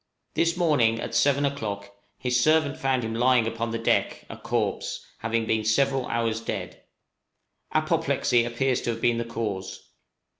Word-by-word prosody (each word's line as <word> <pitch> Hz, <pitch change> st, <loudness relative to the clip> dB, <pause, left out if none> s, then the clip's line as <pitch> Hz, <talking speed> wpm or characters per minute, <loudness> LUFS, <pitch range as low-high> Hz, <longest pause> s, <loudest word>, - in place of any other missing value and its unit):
This 170 Hz, +1 st, +1 dB
morning, 135 Hz, -10 st, +3 dB
at -, -, -5 dB
seven 140 Hz, 0 st, +3 dB
o'clock, 100 Hz, -8 st, -4 dB, 0.3 s
his 125 Hz, -1 st, +1 dB
servant 155 Hz, 0 st, +3 dB
found 130 Hz, -2 st, 0 dB
him 115 Hz, 0 st, -3 dB
lying 125 Hz, 0 st, +3 dB
upon 115 Hz, +1 st, -2 dB
the 115 Hz, -, -2 dB
deck, 115 Hz, -, 0 dB
a -, -, -6 dB
corpse, -, -, -2 dB
having 115 Hz, 0 st, -1 dB
been 110 Hz, -1 st, 0 dB
several 135 Hz, +4 st, +1 dB
hours 115 Hz, -1 st, -1 dB
dead. -, -, -5 dB, 0.9 s
Apoplexy 120 Hz, -1 st, +2 dB
appears 120 Hz, +2 st, 0 dB
to -, -, -3 dB
have 115 Hz, -1 st, -3 dB
been 120 Hz, -1 st, +2 dB
the 115 Hz, -, -2 dB
cause. 105 Hz, -5 st, -5 dB
115 Hz, 155 wpm, -26 LUFS, 115-135 Hz, 0.9 s, morning